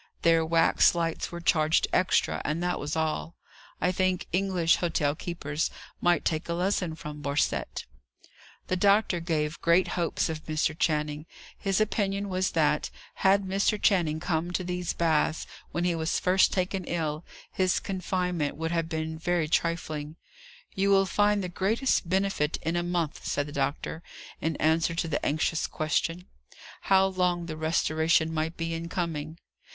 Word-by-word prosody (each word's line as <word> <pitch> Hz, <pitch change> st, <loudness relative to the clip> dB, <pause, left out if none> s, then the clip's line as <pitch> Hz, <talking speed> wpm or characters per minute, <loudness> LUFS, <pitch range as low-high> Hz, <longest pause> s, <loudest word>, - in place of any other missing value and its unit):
Their 165 Hz, -1 st, +4 dB
wax 165 Hz, +1 st, +4 dB
lights 165 Hz, -1 st, -2 dB
were 170 Hz, 0 st, -6 dB
charged 160 Hz, -1 st, +3 dB
extra, 185 Hz, 0 st, +2 dB
and 160 Hz, +4 st, -2 dB
that 180 Hz, 0 st, -1 dB
was 150 Hz, +2 st, -3 dB
all. 160 Hz, +1 st, -2 dB, 0.4 s
I 180 Hz, -, +2 dB
think 185 Hz, 0 st, 0 dB
English 180 Hz, -3 st, +2 dB
hotel 155 Hz, -4 st, 0 dB
keepers 155 Hz, -2 st, -3 dB, 0.3 s
might 175 Hz, 0 st, +2 dB
take 160 Hz, +2 st, -1 dB
a 170 Hz, -, 0 dB
lesson 180 Hz, -2 st, 0 dB
from 150 Hz, -2 st, -8 dB
Borcette! 140 Hz, 0 st, -1 dB, 0.8 s
The 185 Hz, -, -1 dB
doctor 200 Hz, -1 st, +3 dB
gave 160 Hz, -2 st, -2 dB
great 170 Hz, +2 st, +3 dB
hopes 170 Hz, -2 st, 0 dB
of 160 Hz, -1 st, -5 dB
Mr. 155 Hz, 0 st, 0 dB
Channing. 150 Hz, -1 st, -1 dB, 0.3 s
His 195 Hz, -1 st, 0 dB
opinion 200 Hz, -2 st, 0 dB
was, 185 Hz, 0 st, 0 dB
that, 150 Hz, -2 st, +2 dB, 0.3 s
had 195 Hz, +1 st, +4 dB
Mr. 195 Hz, +2 st, +1 dB
Channing 170 Hz, -7 st, +2 dB
come 170 Hz, 0 st, -1 dB
to 185 Hz, -, -1 dB
these 180 Hz, -1 st, -2 dB
baths 160 Hz, -1 st, +1 dB, 0.2 s
when 175 Hz, -, -2 dB
he 175 Hz, -1 st, +2 dB
was 160 Hz, 0 st, -1 dB
first 185 Hz, +1 st, +4 dB
taken 185 Hz, 0 st, -1 dB
ill, 155 Hz, -2 st, -2 dB, 0.3 s
his 185 Hz, -1 st, +1 dB
confinement 180 Hz, -5 st, -2 dB
would 160 Hz, +1 st, -2 dB
have 165 Hz, -1 st, -1 dB
been 160 Hz, 0 st, -3 dB
very 175 Hz, -1 st, 0 dB
trifling. 155 Hz, -2 st, -1 dB, 0.6 s
"You 195 Hz, +1 st, +1 dB
will 195 Hz, -1 st, +5 dB
find 205 Hz, +2 st, +2 dB
the -, -, -2 dB
greatest 195 Hz, +2 st, 0 dB
benefit 190 Hz, -5 st, 0 dB
in 165 Hz, +1 st, -1 dB
a 175 Hz, -, +1 dB
month," 175 Hz, -3 st, -2 dB
said 145 Hz, -, 0 dB
the 145 Hz, -, -9 dB
doctor, 140 Hz, +3 st, -2 dB, 0.4 s
in 160 Hz, -1 st, -1 dB
answer 160 Hz, +2 st, +1 dB
to 165 Hz, 0 st, -1 dB
the 150 Hz, -, -2 dB
anxious 155 Hz, +2 st, 0 dB
question, 165 Hz, +3 st, -1 dB, 0.6 s
How 190 Hz, 0 st, +6 dB
long 180 Hz, -2 st, 0 dB
the 160 Hz, -2 st, -5 dB
restoration 160 Hz, 0 st, +1 dB
might 160 Hz, +1 st, -2 dB
be 165 Hz, 0 st, -2 dB
in 165 Hz, +1 st, -4 dB
coming. 160 Hz, -3 st, -3 dB
170 Hz, 160 wpm, -28 LUFS, 160-185 Hz, 0.8 s, How